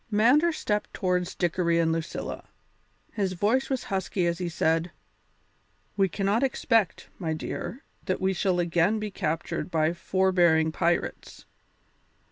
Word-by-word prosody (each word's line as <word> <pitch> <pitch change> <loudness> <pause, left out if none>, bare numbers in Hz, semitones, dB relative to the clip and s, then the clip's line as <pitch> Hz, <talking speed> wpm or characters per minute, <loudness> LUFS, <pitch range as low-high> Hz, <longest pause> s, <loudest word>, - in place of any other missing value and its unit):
Mander 250 +11 +4
stepped 210 -9 -2
towards 180 -2 -1
Dickory 170 -1 +1
and 165 -1 +2
Lucilla; 165 0 -4 0.7
his 195 -4 -1
voice 220 +9 +1
was 265 -2 -1
husky 190 -2 -1
as 170 0 0
he 180 -1 -2
said: 165 +1 +1 1.1
"We 195 -1 +2
cannot 200 +5 0
expect, 230 -6 +1
my 165 -4 -1
dear, 240 - -5 0.2
that 185 - -1
we 190 0 +1
shall 185 -1 0
again 175 +4 +2
be 210 -1 -4
captured 160 -1 -3
by 160 -1 +1
forbearing 175 -3 +2
pirates. 170 +2 -2
185 Hz, 130 wpm, -27 LUFS, 170-210 Hz, 1.1 s, Mander